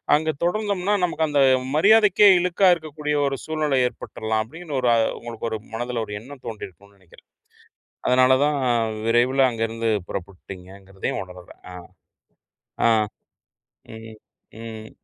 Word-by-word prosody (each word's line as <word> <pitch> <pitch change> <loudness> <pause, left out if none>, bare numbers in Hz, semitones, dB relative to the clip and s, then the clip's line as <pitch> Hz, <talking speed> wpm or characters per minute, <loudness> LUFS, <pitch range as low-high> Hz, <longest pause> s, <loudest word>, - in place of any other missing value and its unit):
அங்கே 155 +1 0
தொடர்ந்தோம்னா, 200 +1 0
நமக்கு 165 -2 0
அந்த 145 -1 0 0.4
மரியாதைக்கே 210 +4 +5
இழுக்கா 180 +2 +2
இருக்கக்கூடிய 150 -2 -4
ஒரு 135 0 -2
சூழ்நிலை 155 -4 0
ஏற்பட்டுரலாம். 110 -2 -4
அப்படிங்கிற 160 +6 -8
ஒரு 125 - +2 0.3
உங்களுக்கு 115 -1 -6
ஒரு 110 - -3 0.2
மனதில 120 0 -3
ஒரு 105 - -7
எண்ணம் 130 +2 -13
தோன்றியிருக்கும்னு 100 -2 -10
நினைக்கிறேன். 90 -3 -21 0.8
அதனால 130 +1 +5
தான் 150 0 +1 0.5
விரைவில 125 +4 +3
அங்கிருந்து 115 0 -2 0.2
புறப்பட்டுட்டீங்க 95 0 -8
என்கிறதையும் 95 0 -5
உணரல. 90 -1 -13 0.2
ஆ. - - -8 2.2
ம், 110 0 -11 0.5
ம். 110 -1 -9
125 Hz, 115 wpm, -23 LUFS, 110-155 Hz, 2.2 s, மரியாதைக்கே